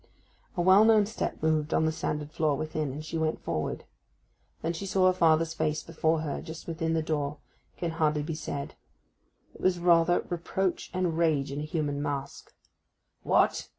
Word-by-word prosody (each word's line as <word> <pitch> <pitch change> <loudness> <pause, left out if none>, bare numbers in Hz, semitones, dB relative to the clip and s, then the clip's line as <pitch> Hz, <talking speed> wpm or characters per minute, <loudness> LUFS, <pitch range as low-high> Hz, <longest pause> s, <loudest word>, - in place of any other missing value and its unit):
A - - +2
well 190 +3 +7
known 220 -2 +5
step 215 -6 -4
moved 155 -1 +1
on 160 - +3
the 160 - +2
sanded 150 -1 -3
floor 155 -3 +1
within, 155 -2 -2
and 150 +3 -7
she 160 +1 -3
went 160 0 0
forward. 75 - -3 0.8
That 165 +1 -1
she 195 +4 -5
saw 190 0 +2
her 185 - +5
father's 165 -2 +3
face 155 -1 -1
before 160 -1 0
her, 150 -3 -3
just 160 -1 -9
within 165 -1 -2
the 160 - +1
door, 150 -2 -2 0.4
can 170 -2 -2
hardly 155 -2 +1
be 160 +2 -3
said: 145 -2 -5 0.8
it - - -14
was 185 -1 +2
rather 175 0 +3
Reproach 180 +2 -2
and 180 -3 -1
Rage 150 -5 +2
in 140 - -4
a 150 - -3
human 150 -3 -2
mask. 140 -1 -4 0.7
'What! - - +2
160 Hz, 180 wpm, -28 LUFS, 150-170 Hz, 0.8 s, well